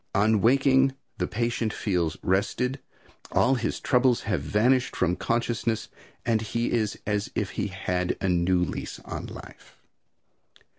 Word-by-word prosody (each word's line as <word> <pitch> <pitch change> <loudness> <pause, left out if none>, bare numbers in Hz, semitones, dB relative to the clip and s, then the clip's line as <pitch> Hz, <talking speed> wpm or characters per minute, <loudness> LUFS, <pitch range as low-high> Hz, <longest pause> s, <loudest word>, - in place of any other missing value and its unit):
On 105 +1 +3
waking, 135 +2 +4 0.2
the - - 0
patient 115 -1 -1
feels 90 -7 -1
rested; 125 +8 0 0.5
all 130 - +3
his 115 -3 -1
troubles 125 -2 +3
have 105 - -1
vanished 125 +5 +2
from 90 0 +1
consciousness 115 0 -1 0.4
and 115 -2 +2
he 115 +2 -1
is 110 -3 0
as 105 0 -1
if 100 -3 -1
he 105 - -2
had 90 -1 -2
a 95 - -1
new 90 0 +2
lease 90 - -4
of - - -6
life. - - -12
110 Hz, 140 wpm, -26 LUFS, 95-120 Hz, 0.5 s, waking